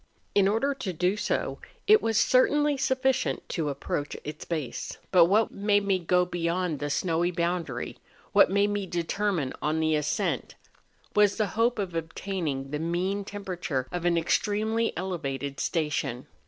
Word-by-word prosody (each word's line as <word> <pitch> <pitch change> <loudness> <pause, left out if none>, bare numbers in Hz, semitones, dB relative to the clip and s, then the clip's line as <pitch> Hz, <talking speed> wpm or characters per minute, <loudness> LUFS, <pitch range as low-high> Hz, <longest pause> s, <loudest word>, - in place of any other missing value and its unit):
In 195 -1 +4
order 225 +8 +1
to 200 -9 -4
do 180 +4 +1
so, 210 - -2 0.3
it 430 0 +6
was 225 -1 +1
certainly 290 +5 +4
sufficient 260 -1 0
to 160 -5 -1
approach 145 +1 -3
its 150 +1 -7
base; 155 -7 -4
but 180 -3 +7
what 210 +5 +3
made 205 0 +1
me 195 -2 +2
go 180 +1 +2
beyond 175 -2 -1
the 145 - -2
snowy 165 +3 +1
boundary—what 170 -7 0
made 200 +1 +2
me 205 -2 -2
determine 175 -3 -1
on 155 +1 0
the 160 0 +2
ascent—was 195 +6 -1
the 215 -2 +1
hope 235 +3 +2
of 195 -4 -3
obtaining 165 -4 -3
the 150 - -2
mean 180 +5 -1
temperature 185 -9 -3
of 180 -1 -3
an 175 -1 +2
extremely 215 +6 +1
elevated 140 -7 -3
station. 145 -6 -1
180 Hz, 145 wpm, -27 LUFS, 160-205 Hz, 0.3 s, but